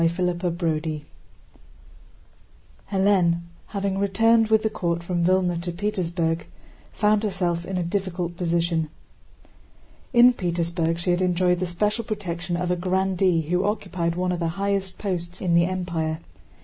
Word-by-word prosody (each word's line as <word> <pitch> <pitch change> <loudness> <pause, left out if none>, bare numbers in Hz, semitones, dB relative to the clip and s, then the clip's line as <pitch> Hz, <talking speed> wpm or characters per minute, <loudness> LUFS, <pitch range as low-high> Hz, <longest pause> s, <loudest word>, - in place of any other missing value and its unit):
CHAPTER 175 +1 +1
VI 160 -3 -2 1.9
Hélène, 190 -4 +3 0.3
having 195 -1 -2
returned 225 +3 +4
with 220 0 +3
the 220 - +2
court 170 -3 -1
from 175 -1 -1
Vílna 180 -2 +2
to 175 0 -3
Petersburg, 170 -4 -1 0.4
found 210 -1 +2
herself 180 -5 -1
in 190 - -3
a 180 - 0
difficult 175 -1 -2
position. 170 -2 0 1.2
In 245 0 +7
Petersburg 170 -3 -1
she 175 +1 0
had 175 +1 +1
enjoyed 180 -1 +2
the 185 - -1
special 210 +6 0
protection 180 -5 -3
of 180 0 -1
a - - +2
grandee 185 -1 +1
who 180 +4 0
occupied 185 -5 -1
one 180 0 0
of 175 - -2
the 170 - 0
highest 195 -1 -1
posts 180 -3 -4
in 180 -2 0
the 170 0 +5
Empire. 170 -4 -2
180 Hz, 140 wpm, -24 LUFS, 170-195 Hz, 1.9 s, In